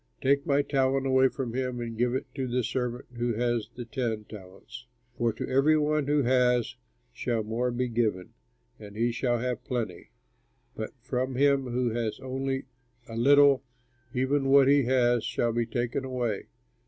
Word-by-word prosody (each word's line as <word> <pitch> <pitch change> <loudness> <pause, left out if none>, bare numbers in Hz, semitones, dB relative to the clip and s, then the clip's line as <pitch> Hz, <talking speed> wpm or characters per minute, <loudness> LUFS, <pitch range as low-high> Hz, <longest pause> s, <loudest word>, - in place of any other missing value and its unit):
Take 140 +3 +1
my 145 0 +3
talent 135 -1 +1
away 130 0 +4
from 130 -3 -4
him 125 -1 -2
and 115 -1 -5
give 120 +2 +1
it 130 - -2
to 135 -2 -3
the 125 0 0
servant 125 +1 -3
who 120 -1 0
has 120 -1 -1
the 120 -1 -6
ten 115 -3 -3
talents; 105 +5 -12 0.3
for 120 -1 +1
to - - -5
every 140 +4 +3
one 150 -1 +1
who 145 -1 +2
has 125 -1 +2 0.4
shall 115 - -1
more 115 +4 -1
be 125 +1 -1
given 110 -6 -1 0.5
and 105 -1 -11
he 120 +2 +1
shall 120 0 0
have 125 -1 -3
plenty; 110 -8 -4 0.7
but 110 - -4
from 130 0 -2
him 140 0 +3
who 125 -1 0
has 115 -1 -2
only 135 0 -3 0.4
a 115 - -8
little, 140 +2 +5 0.5
even 135 +3 0
what 135 -1 +6
he 140 -1 +4
has 120 -2 +2
shall 120 +1 -1
be 120 0 0
taken 120 +2 -2
away. 125 -5 -3
125 Hz, 170 wpm, -28 LUFS, 120-135 Hz, 0.7 s, what